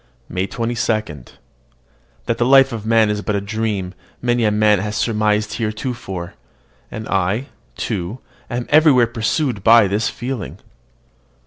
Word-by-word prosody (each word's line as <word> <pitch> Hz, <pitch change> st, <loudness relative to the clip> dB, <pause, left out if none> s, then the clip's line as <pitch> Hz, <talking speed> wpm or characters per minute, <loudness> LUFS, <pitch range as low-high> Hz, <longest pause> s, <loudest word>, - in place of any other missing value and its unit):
MAY 90 Hz, +1 st, -2 dB
22. 110 Hz, -, -3 dB, 0.9 s
That 115 Hz, -, -1 dB
the -, -, +3 dB
life 135 Hz, +1 st, +6 dB
of 110 Hz, -2 st, -6 dB
man 110 Hz, -2 st, +4 dB
is 105 Hz, 0 st, -2 dB
but 105 Hz, 0 st, -2 dB
a -, -, +1 dB
dream, 100 Hz, -2 st, -3 dB, 0.3 s
many 120 Hz, -1 st, +1 dB
a -, -, +4 dB
man 105 Hz, -1 st, +3 dB
has 105 Hz, +2 st, -3 dB
surmised 105 Hz, -1 st, 0 dB
heretofore; 110 Hz, -5 st, -4 dB, 0.6 s
and 110 Hz, 0 st, -7 dB
I, 95 Hz, +7 st, -1 dB, 0.3 s
too, 100 Hz, 0 st, -3 dB, 0.3 s
am 120 Hz, -1 st, -3 dB
everywhere 150 Hz, -5 st, +5 dB
pursued 115 Hz, -, -1 dB
by 115 Hz, -1 st, +6 dB
this 105 Hz, +4 st, 0 dB
feeling. 125 Hz, -3 st, -5 dB
110 Hz, 135 wpm, -19 LUFS, 105-120 Hz, 0.9 s, life